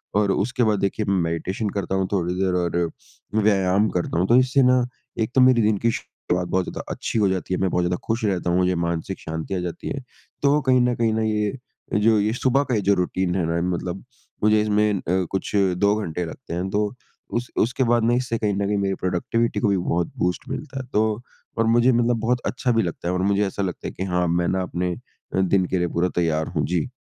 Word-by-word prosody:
और 100 -1 +3
उसके 120 +6 0
बाद 105 -3 +2
देखिए 100 +2 -1
मैं 100 - +2
मेडिटेशन 95 +6 -2
करता 100 -1 -2
हूँ, 95 -1 0
थोड़ी 90 -3 0
देर 95 0 0
और 85 -1 0 0.7
व्यायाम 100 0 +3
करता 85 -1 -1
हूँ। 90 - +2
तो 120 +4 +5
इससे 130 +2 +4
ना 125 0 +4 0.4
एक 110 - -3
तो 130 - +6
मेरी 125 -2 +6
दिन 105 -1 +2
की 115 +4 +1
शुरुआत 90 -4 -3
बहुत 95 +1 +1
ज़्यादा - - -5
अच्छी 115 - -2
हो 100 -2 +3
जाती 95 0 -2
है। 90 - 0
मैं 95 - +2
बहुत 90 0 +1
ज़्यादा 90 0 0
खुश 115 0 0
रहता 90 -3 0
हूँ, 85 - +2
मुझे 90 0 +2
मानसिक 85 +2 -2
शांति 80 +4 -5
आ 90 - -1
जाती 90 -1 -5
है। 135 - -4 0.4
तो 145 +1 +4
कहीं 130 -1 +3
न 125 0 +2
कहीं 115 -2 +1
ना 110 - 0
ये, 105 +3 0 0.4
जो 110 +1 +4
ये 105 +2 +1
सुबह 130 +3 +2
का 130 -4 -1
ये 105 - +1
जो 100 +1 +3
रूटीन 90 0 -1
है 90 - +1
ना, 85 0 0
मतलब 90 +2 -5 0.4
मुझे 105 0 +5
इसमें 105 0 +2
अ, 95 - -2 0.3
कुछ 95 - -2
2 100 +1 +3
घंटे 90 -5 -3
लगते 85 +4 -8
हैं। 90 +3 -2
तो 105 +2 0 0.4
उस 120 0 -3
उसके 120 +4 +1
बाद 120 -1 +2
मैं, 120 +1 +3
इससे 125 -2 -1
कहीं 105 -2 0
न 100 +1 -1
कहीं 105 0 0
मेरी 100 -1 0
प्रोडक्टिविटी 95 +6 -1
को 120 - +1
भी 100 - +2
बहुत 85 -1 -1
बूस्ट 90 -1 -1
मिलता 135 -2 -5
है। 130 - -11
तो 110 +1 +1 0.4
और 115 - +2
मुझे 120 +3 +4
मतलब 120 -1 +2
बहुत 120 +2 0
अच्छा 125 0 0
भी 115 -1 +2
लगता 85 -1 -4
है 90 - 0
और 90 - 0
मुझे 100 +1 +2
ऐसा 100 - -4
लगता 90 -3 -4
है - - -4
कि 95 - -4
हाँ, 90 -2 0
मैं 85 +1 +1
ना 95 0 0
अपने 90 0 -2
अ, 95 - -7
दिन 95 0 +2
के 95 - -1
लिए 90 -1 +1
पूरा 85 +2 0
तैयार 80 -2 +1
हूँ। 75 - +1
जी। 90 +7 -1
100 Hz, 240 wpm, -23 LUFS, 90-115 Hz, 0.7 s, तो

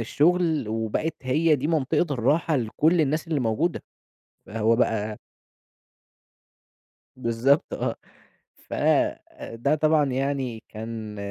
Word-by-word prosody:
الشُغل 160 +1 +1
وبقت 110 +8 -2
هي 150 +4 +2
دي 140 +3 -2
منطقة 155 +1 +1
الراحة 145 +6 +1
لكل 150 +9 +2
الناس 155 +3 0
اللي 150 -4 0
موجودة. 125 +10 0 0.6
فهو 115 +1 +1
بقى 110 -3 0 2.0
بالضبط 125 +4 +1
آه، - - -2 0.6
ف - - -9 0.7
ده 130 +6 -1
طبعًا 155 -1 +3
يعني 130 -4 -2
كان 110 -1 -7
135 Hz, 100 wpm, -25 LUFS, 115-155 Hz, 2.0 s, طبعًا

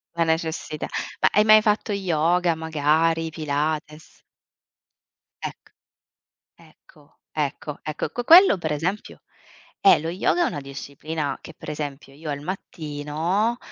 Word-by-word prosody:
La 170 - +2
necessità. 160 -1 -2 0.3
Ma - - +5
hai 210 - +4
mai 215 0 +7
fatto 210 0 +1
yoga, 175 -2 +1
magari 160 +1 +1
Pilates? 155 0 -3 1.2
Ecc - - -8 0.8
ecco, 145 -1 -22 0.2
ecco, 150 0 -3
ecco 155 0 -4
co 245 - -4
quello 345 - +8
per 155 -3 -2
esempio 175 +8 -3 0.6
eh, - - +8
lo 160 - -5
yoga 215 - +1
è - - +1
una 145 - -4
disciplina 140 +2 -5
che 160 - -11
per - - -8
esempio 145 -2 -6
io 155 +2 -8
al 145 -1 -3
mattino, 165 +5 -2
160 Hz, 125 wpm, -24 LUFS, 150-180 Hz, 1.2 s, quello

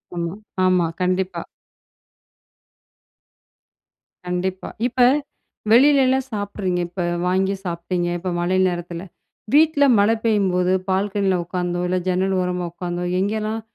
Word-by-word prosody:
ஆமா 170 0 -3 0.3
ஆமா, 180 -2 +3 0.2
கண்டிப்பா. 185 +1 0 2.8
கண்டிப்பா, 180 +1 -3 0.2
இப்ப 255 +1 -7 0.7
வெளிலலாம் 265 0 +5
சாப்ட்றீங்க, 200 -3 -2
இப்ப 175 0 -4 0.2
வாங்கி 190 +2 +1
சாப்டீங்க 175 0 -2
இப்ப 185 +1 -3
மழை 180 +2 +1
நேரத்தில. 175 -1 -4 0.5
வீட்ல 305 -1 +5 0.2
மழ 205 +1 +4
பெய்யும்போது 190 -5 +2 0.2
பால்கனியில 195 -1 +1
உட்காந்தோ, 175 0 -3
இல்ல 185 +1 0
ஜன்னல் 190 +1 +1
ஓரமா 180 -1 -2
உட்காந்தோ 175 0 -4 0.2
எங்கேலாம் 215 +3 -1
185 Hz, 100 wpm, -21 LUFS, 180-205 Hz, 2.8 s, வெளிலலாம்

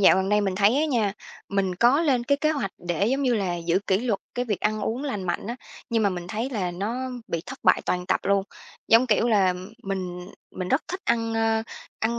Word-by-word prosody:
dạo 190 - +7
gần 190 0 0
đây 210 +1 +3
mình 195 -2 0
thấy 205 +5 +4
á - - +2
nha, 235 -9 +1 0.4
mình 195 -2 0
có 240 - +4
lên 260 -7 +2
cái 280 +3 +3
kế 310 - +3
hoạch 280 -11 -1
để, 175 +2 -1
giống 270 +4 +1
như 250 -3 +2
là, 190 -5 -1
giữ 170 +1 +1
kỷ 190 +1 +2
luật 230 -5 -1
cái 245 - -1
việc 210 -5 -2
ăn 215 0 0
uống 245 +7 -2
lành 235 -9 -3
mạnh 180 - -2
á, 235 +2 -4 0.3
nhưng 225 -1 +2
mà 205 - +4
mình 175 -2 -5
thấy 225 +6 -3
là 195 -8 -1
nó 200 +6 -3 0.3
bị 165 -1 -2
thất - - -7
bại - - +5
toàn 180 0 -1
tập - - +1
luôn. 200 0 +2 0.5
Giống 230 +3 +6
kiểu 230 +1 +2
là, 195 -4 +3 0.3
mình 180 -2 -4 0.3
mình 185 -1 -3
rất 265 - +2
thích 370 +3 -4
ăn 230 -1 +1
a, 225 0 +2 0.4
ăn 235 +2 0
210 Hz, 240 wpm, -25 LUFS, 190-240 Hz, 0.5 s, dạo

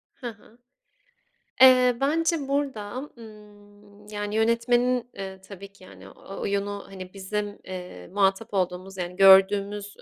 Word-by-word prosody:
Hı 250 - -7
hı. 225 +1 -20 1.0
Eee, 255 -2 +7
bence 310 0 0
burada, 270 -2 -3
ımm, 205 -1 -16
yani, 205 0 -5
yönetmenin, 240 +2 +1
ııı, 190 -1 -7
tabii 200 0 -11
ki, 195 -2 -18
yani, - - -14
o 195 - -11
oyunu, 200 0 -3
hani, 185 -1 -10
bizim, 205 +1 -4
eee, 180 - -9
muhatap 200 +2 0
olduğumuz, 185 +1 -2
yani, 180 0 -5
gördüğümüz, 200 +1 +4
205 Hz, 125 wpm, -25 LUFS, 195-235 Hz, 1.0 s, Eee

